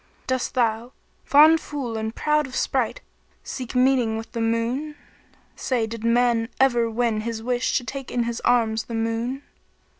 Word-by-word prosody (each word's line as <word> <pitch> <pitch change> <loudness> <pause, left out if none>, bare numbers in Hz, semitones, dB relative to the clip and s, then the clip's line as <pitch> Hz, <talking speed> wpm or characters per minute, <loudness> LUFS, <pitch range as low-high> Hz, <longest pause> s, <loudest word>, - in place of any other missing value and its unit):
Dost 260 -1 -2
thou, 235 0 0 0.3
fond 310 +3 +6
fool 270 -8 -5
and 220 0 -3
proud 300 -1 +1
of 260 - -9
sprite, - - -1 0.4
seek 255 -2 -6
meeting 250 -3 +3
with 225 - -8
the 230 - -3
Moon? 235 +7 -1 0.3
* - - -35 0.2
Say, 245 -4 -1
did 225 0 -7
man 230 -1 +2
ever 240 -3 +3
win 225 -1 0
his 225 0 -4
wish 245 +1 0
to - - -3
take 270 +2 -6
in 240 -1 -1 0.2
arms 225 -2 +2
the 230 - -6
Moon? 230 +4 -2
240 Hz, 160 wpm, -23 LUFS, 225-260 Hz, 0.4 s, fond